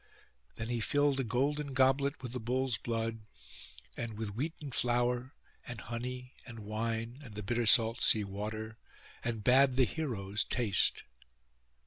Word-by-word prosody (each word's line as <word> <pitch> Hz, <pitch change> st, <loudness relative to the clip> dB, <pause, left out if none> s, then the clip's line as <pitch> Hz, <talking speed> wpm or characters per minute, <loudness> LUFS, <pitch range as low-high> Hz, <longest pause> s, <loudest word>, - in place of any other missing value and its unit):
Then 115 Hz, +1 st, -5 dB
he 120 Hz, -1 st, -1 dB
filled 145 Hz, +5 st, +2 dB
a -, -, +1 dB
golden 140 Hz, +4 st, -1 dB
goblet 135 Hz, +2 st, +2 dB
with 125 Hz, -, -5 dB
the 125 Hz, -, -3 dB
bull's 125 Hz, -1 st, 0 dB
blood, 115 Hz, -1 st, -2 dB, 0.8 s
and 115 Hz, -3 st, -5 dB
with 110 Hz, -2 st, -4 dB
wheaten 145 Hz, +4 st, -4 dB
flour, 120 Hz, +2 st, 0 dB, 0.3 s
and 120 Hz, -4 st, -6 dB
honey, 125 Hz, +3 st, -5 dB
and 120 Hz, -2 st, -10 dB
wine, 115 Hz, +3 st, -3 dB
and 110 Hz, -6 st, -11 dB
the 105 Hz, -, -5 dB
bitter 120 Hz, +3 st, 0 dB
salt 115 Hz, +1 st, +6 dB
sea 110 Hz, -, +5 dB
water, 110 Hz, +3 st, -5 dB, 0.4 s
and 115 Hz, -3 st, -2 dB
bade 130 Hz, +2 st, +5 dB
the 130 Hz, -1 st, +5 dB
heroes 105 Hz, -10 st, -2 dB
taste. 110 Hz, -7 st, +1 dB
120 Hz, 145 wpm, -32 LUFS, 110-130 Hz, 0.8 s, salt